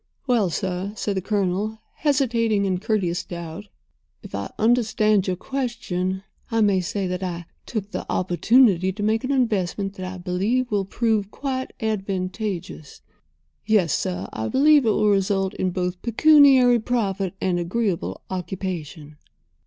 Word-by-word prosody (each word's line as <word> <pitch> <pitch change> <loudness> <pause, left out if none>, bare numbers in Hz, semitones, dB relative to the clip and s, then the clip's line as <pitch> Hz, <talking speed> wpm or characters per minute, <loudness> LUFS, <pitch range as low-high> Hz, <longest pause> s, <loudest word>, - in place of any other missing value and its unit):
"Well, 235 -8 +2
sir," 185 +3 -3
said 205 -2 -2
the 190 - -1
Colonel, 205 +2 -1 0.2
hesitating 235 -8 +1
in 185 -2 0
courteous 185 -4 -1
doubt, 170 +3 -7 0.6
"if - - -11
I - - -3
understand 215 -3 +2
your 185 - 0
question, 195 -6 -3 0.3
I 225 -1 +1
may 200 -3 +3
say 195 +2 -2
that 180 0 -3
I 175 -2 -4 0.2
took 210 -3 -4
the - - -5
opportunity 190 +1 +3
to 205 +2 -5
make 220 +2 +1
an 260 - -1
investment 205 -6 0
that 185 -1 -5
I 185 - -7
believe 200 +8 -1
will 200 -2 +1
prove 215 -1 0
quite 260 +1 -4
advantageous—yes, 195 - -3
sir, 90 +2 -2
I 110 0 -3
believe 285 - +4
it - - +5
will 210 0 +2
result 195 -1 +1
in 185 - -1
both 180 0 -3
pecuniary 260 -1 +6
profit 200 -5 -1
and 180 -2 0
agreeable 175 - -2
occupation." 175 -5 -5
200 Hz, 140 wpm, -23 LUFS, 180-225 Hz, 0.6 s, pecuniary